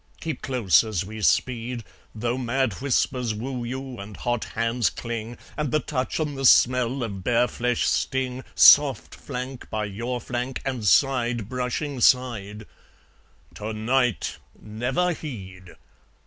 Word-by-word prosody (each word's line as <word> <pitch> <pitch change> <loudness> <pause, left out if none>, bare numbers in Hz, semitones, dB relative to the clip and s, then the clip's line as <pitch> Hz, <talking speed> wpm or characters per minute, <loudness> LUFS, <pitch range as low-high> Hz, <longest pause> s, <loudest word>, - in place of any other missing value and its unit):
Keep 160 -2 -4
close 120 - +3
as 105 -5 -2
we 110 +2 -8
speed, 120 +1 0 0.3
Though 120 +2 -1
mad 130 -1 0
whispers 125 -4 0
woo 125 +3 -4
you, 130 +1 -6
and 100 0 -9
hot 120 -2 -1
hands 115 0 0
cling, 115 0 -6 0.2
And 150 -2 -2
the 155 - +3
touch 130 -2 -3
and 150 -2 -2
the 135 - -5
smell 125 0 +4
of 100 -5 -5
bare 120 +2 +3
flesh 125 -1 -1
sting, 130 -1 -1
Soft - - +6
flank 125 +1 -7
by 110 -1 -2
your 115 +5 -4
flank, 125 +2 -4
and 130 -4 -3
side 120 -4 +2
brushing 125 +3 -3
side 110 -5 +2 0.9
TO 110 +1 -5
NIGHT 120 +1 0 0.2
never 125 +12 -1
heed! 95 - -9
120 Hz, 135 wpm, -25 LUFS, 110-130 Hz, 0.9 s, Soft